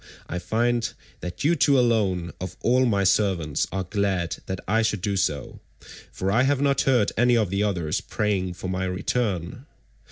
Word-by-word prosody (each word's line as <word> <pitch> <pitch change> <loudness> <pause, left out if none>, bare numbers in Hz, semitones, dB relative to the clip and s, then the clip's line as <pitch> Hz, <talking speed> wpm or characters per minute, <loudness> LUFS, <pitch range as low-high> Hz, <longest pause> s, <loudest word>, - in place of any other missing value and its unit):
I 90 - -3
find 115 +5 0 0.3
that 90 0 -6
you 165 +4 +3
two 140 -2 +4
alone 100 -8 +1
of 90 -1 -6
all 125 +2 +3
my 100 -4 +2
servants 95 -6 +1
are 95 0 -2
glad 95 -2 -1
that 95 -1 -3
I 110 +3 +2
should 105 -3 0
do 100 +1 -1
so, 75 -7 -2 0.5
for 95 +1 -2
I 115 +5 +3
have 135 +1 +2
not 140 -1 +2
heard 120 -6 +3
any 120 +1 +4
of 105 -5 0
the 100 +1 0
others 90 -7 -1
praying 95 -4 -1
for 95 - -6
my 95 0 -2
return. 95 - -2
100 Hz, 180 wpm, -25 LUFS, 90-120 Hz, 0.5 s, two